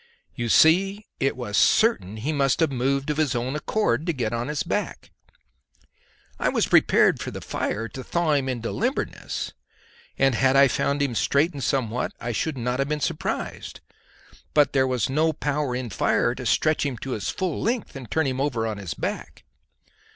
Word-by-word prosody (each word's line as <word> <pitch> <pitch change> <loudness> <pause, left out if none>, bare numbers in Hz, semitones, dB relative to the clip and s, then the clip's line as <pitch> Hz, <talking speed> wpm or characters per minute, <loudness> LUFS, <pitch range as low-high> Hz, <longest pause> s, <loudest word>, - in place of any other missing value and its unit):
You 120 -1 -3
see, 195 - +4
it 135 -1 0
was 105 -5 -4
certain 110 - +3
he 140 +9 -2
must 140 -3 +1
have 160 -3 +2
moved 135 +3 0
of 150 - -3
his 150 -4 +1
own 125 +4 -2
accord 155 - 0
to 170 - +1
get 120 -5 -2
upon 120 +1 -2
his 150 -1 -2
back. - - -3 1.3
I - - +2
was - - +1
prepared - - +4
for - - -4
the - - -7
fire 115 +2 -3
to 130 +5 -8
thaw 170 +1 0
him 135 -2 +1
into 120 -2 -3
limberness, 250 +6 -3 0.6
and 135 -1 +3
had 130 +3 +3
I 140 0 +6
found 140 +2 0
him 135 -4 -1
straightened 140 +4 +1
somewhat 125 -3 -1
I 120 - -3
should 140 +5 -2
not 125 +1 -2
have 135 +1 0
been 150 0 -1
surprised. - - -3 0.8
But 150 -1 +4
there 130 -1 +3
was 125 -4 0
no 155 +4 +1
power 145 -3 -1
in 125 -3 -4
fire - - +1
to - - -5
stretch 155 0 +2
him 140 -4 -2
to 135 +4 -6
his 105 -5 -2
full 185 -5 -2
length 235 -6 -2
and 130 -4 -8
turn 160 -1 +1
him 130 0 -1
over 125 -6 0
on 110 -2 -3
his 95 -4 -5
back. - - -5
135 Hz, 190 wpm, -24 LUFS, 125-150 Hz, 1.3 s, I